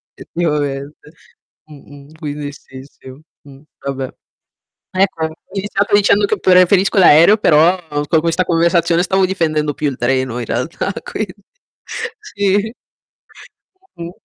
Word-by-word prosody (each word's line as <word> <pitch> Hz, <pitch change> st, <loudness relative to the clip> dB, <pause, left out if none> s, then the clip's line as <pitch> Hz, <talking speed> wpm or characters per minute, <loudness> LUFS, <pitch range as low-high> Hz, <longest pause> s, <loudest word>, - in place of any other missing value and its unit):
Effettivamente. 150 Hz, -3 st, -4 dB, 0.6 s
Mh-mh, 145 Hz, 0 st, -15 dB
quindi 145 Hz, -2 st, -5 dB
sì, 130 Hz, -2 st, -13 dB
sì. 135 Hz, -1 st, -16 dB, 0.4 s
Mh, 135 Hz, -1 st, -15 dB, 0.2 s
vabbè. 135 Hz, -1 st, -3 dB, 0.8 s
Ecco, 185 Hz, -4 st, +1 dB
ho 160 Hz, -, -4 dB, 0.2 s
iniziato 200 Hz, 0 st, 0 dB
dicendo 205 Hz, 0 st, +4 dB
che -, -, -1 dB
preferisco 185 Hz, +2 st, +4 dB
l'aereo, 170 Hz, +5 st, +7 dB
però 170 Hz, -1 st, +4 dB, 0.3 s
con 160 Hz, -, +3 dB
questa 170 Hz, +2 st, 0 dB
conversazione 170 Hz, 0 st, +2 dB
stavo 190 Hz, +1 st, +2 dB
difendendo 155 Hz, -5 st, -1 dB
più 150 Hz, -, -2 dB
il 135 Hz, -, -6 dB
treno 130 Hz, 0 st, -1 dB
in 120 Hz, -, -4 dB
realtà, 125 Hz, -, -3 dB
quindi 200 Hz, -4 st, -5 dB, 0.9 s
sì. 205 Hz, -, -1 dB, 1.2 s
Mh-mh. 170 Hz, 0 st, -7 dB
165 Hz, 120 wpm, -17 LUFS, 145-190 Hz, 1.2 s, l'aereo